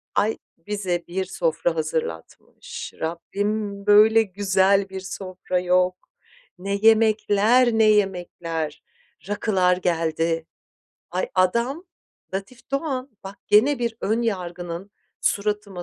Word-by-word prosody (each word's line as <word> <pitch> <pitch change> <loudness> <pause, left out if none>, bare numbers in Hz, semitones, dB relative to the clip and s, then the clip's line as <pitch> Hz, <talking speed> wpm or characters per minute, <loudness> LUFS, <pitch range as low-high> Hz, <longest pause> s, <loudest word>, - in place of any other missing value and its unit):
Ay, 215 +2 +1 0.3
bize 185 -4 -2
bir 190 +2 -2
sofra 170 -2 -1
hazırlatmış. 155 - -5
Rabbim, 200 +5 -3
böyle 215 +2 +7
güzel 195 0 +2
bir 190 0 -6
sofra 185 -1 -4
yok. 180 0 +2 0.6
Ne 200 +2 -2
yemekler, 220 +2 +4
ne 225 0 +4
yemekler, 175 -6 0 0.5
rakılar 190 -4 +2
geldi. 165 -2 -1 0.6
Ay, 180 +2 -2
adam, 235 - +1 0.5
Latif 200 +7 -7
Doğan, 275 -2 -2
bak 195 +1 -8
gene 240 +7 +5
bir 235 -2 -2
ön 225 +3 0
yargının 180 -3 -4 0.3
suratıma 205 -3 -1
195 Hz, 100 wpm, -23 LUFS, 180-215 Hz, 0.6 s, böyle